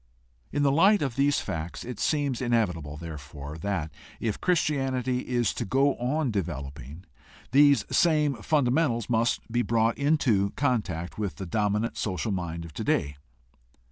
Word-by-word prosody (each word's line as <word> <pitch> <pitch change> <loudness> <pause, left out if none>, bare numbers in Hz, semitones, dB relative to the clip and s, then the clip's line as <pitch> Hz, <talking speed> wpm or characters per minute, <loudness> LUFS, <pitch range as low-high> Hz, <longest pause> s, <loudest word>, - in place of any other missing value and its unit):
In 145 - 0
the 140 - +4
light 195 +6 +5
of 135 -5 -2
these 140 +1 +2
facts 80 +1 -5
it 125 -2 -6
seems 145 -5 0
inevitable, 90 - 0
therefore, 75 -1 -8
that, 80 -4 -2 0.3
if 110 -3 -2
Christianity 135 -7 +1
is 120 -3 0
to - - -3
go 135 +7 +2
on 130 +2 0
developing, 75 - -5 0.5
these 140 +1 +5
same 150 -4 +3
funda 140 0 +2
mentals 120 -7 +1
must 115 +1 +2
be 120 +1 +2
brought 115 -1 +1
into 130 -9 +2
contact 105 - -1
with 100 -3 -2
the 95 - -6
dominant 105 +4 0
social 105 +2 -2
mind 85 -3 -3
of 80 - -11
today. 70 -1 -1
115 Hz, 145 wpm, -27 LUFS, 85-140 Hz, 0.5 s, light